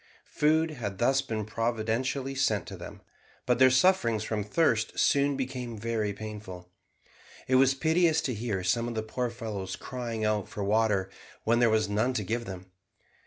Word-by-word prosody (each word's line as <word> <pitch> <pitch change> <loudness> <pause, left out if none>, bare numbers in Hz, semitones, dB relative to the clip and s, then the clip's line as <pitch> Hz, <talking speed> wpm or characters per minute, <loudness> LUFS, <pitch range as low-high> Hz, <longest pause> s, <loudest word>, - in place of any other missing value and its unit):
Food 160 +2 +2
had 105 -9 -5
thus 135 +5 +3
been 110 -4 -4
providentially 115 +4 -1
sent 110 -8 +1
them, - - -9 0.4
but 125 -1 +2
their 130 0 +7
sufferings 130 - +3
from 110 -1 -2
thirst 110 -1 +1
soon 140 0 +3
became 125 -3 -4
very 110 -1 -1
painful. 100 -4 -8 0.8
It 130 - -1
was 135 0 +4
piteous 160 +2 +3
to 130 - -2
hear 105 -4 -3
some 115 +6 +1
of 120 - -4
the 110 - -1
poor 120 +3 -2
fellows 110 -5 -5
crying 120 -4 -4
out 105 -2 0
for 105 - -5
water 105 -2 +1 0.3
when 115 +1 +2
there 120 -1 +5
was 110 -1 +2
none 110 +5 0
to 110 - -1
give 115 +4 -2
them. 95 -2 -9
115 Hz, 165 wpm, -28 LUFS, 105-130 Hz, 0.8 s, their